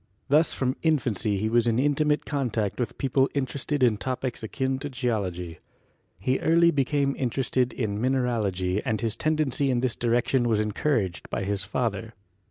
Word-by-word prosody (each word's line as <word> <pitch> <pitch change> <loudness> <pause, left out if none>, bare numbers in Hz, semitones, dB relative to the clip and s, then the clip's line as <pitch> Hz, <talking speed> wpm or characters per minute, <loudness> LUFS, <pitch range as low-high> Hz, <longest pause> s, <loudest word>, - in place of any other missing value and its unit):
Thus 150 +3 +4
from 130 0 -1
infancy 120 - +1
he 105 +3 -1
was 120 +1 +2
in 115 -1 +2
intimate 150 +2 +1
con 140 -4 -1
tact 110 -1 -2
with 120 -4 -2
people 135 0 +2
interested 140 +1 -1
in 115 -4 +4
topics 130 +1 -3
akin 130 +4 -2
to 145 +1 -5
Geology. 100 - -3 0.6
He 130 +8 0
early 170 +1 +4
became 140 -1 +1
interested 125 0 0
in 105 -3 -3
mineralogy 110 -7 0
and 110 -1 -1
his 115 -1 -2
tendency 150 -3 0
in 125 -2 +1
this 125 -3 0
direction 120 +1 +1
was 110 -2 +2
encouraged 105 - -1
by - - -2
his 100 0 -1
father. 115 0 -3
125 Hz, 165 wpm, -26 LUFS, 110-135 Hz, 0.6 s, Thus